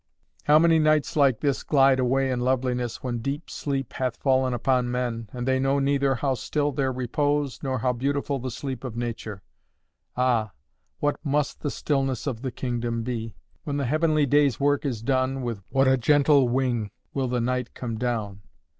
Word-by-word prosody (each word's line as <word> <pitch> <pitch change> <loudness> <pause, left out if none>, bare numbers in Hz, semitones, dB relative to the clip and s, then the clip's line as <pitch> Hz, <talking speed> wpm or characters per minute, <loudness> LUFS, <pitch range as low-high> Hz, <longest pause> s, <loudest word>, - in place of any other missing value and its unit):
How 150 +1 +6
many 165 0 +5
nights 155 -1 +2
like 140 -6 +3
this 140 -3 0
glide 135 -2 +4
away 130 +1 +1
in 125 - -1
loveliness, 125 -1 -1
when 120 -2 -2
deep 140 +7 -4
sleep 135 -4 -3
hath 130 -3 -2
fallen 130 -1 +2
upon 125 +1 +1
men, 120 -3 -3
and 125 0 -5
they 130 0 +2
know 135 +1 +2
neither 140 -1 +2
how 135 +2 0
still 145 +3 -1
their 135 -1 0
own 130 - -4
repose, 145 +2 -1
nor 130 -2 -1
how 125 +1 0
beautiful 140 +2 -1
the 130 +1 -4
sleep 130 +1 -5
of 120 -3 -6
nature! 110 -4 -5 0.7
Ah, 120 -5 +1 0.4
what 145 0 -1
must 145 -1 0
the 145 - -2
stillness 135 -2 -1
of 125 -6 -3
the 130 -1 -3
kingdom 120 -2 -3
be? 115 -2 -4 0.3
When 145 -1 -3
the 140 - -1
heavenly 155 +2 +2
day's 140 -3 +3
work 145 +1 +1
is 115 -5 -4
done, 130 0 0
with 115 -5 -4
what 135 0 +3
a 130 0 +4
gentle 140 0 +4
wing 120 -4 0 0.2
will 135 -2 -1
the 125 0 -1
night 125 +1 -2
come 115 -3 -4
down! 110 -5 -2
130 Hz, 185 wpm, -25 LUFS, 120-140 Hz, 0.7 s, How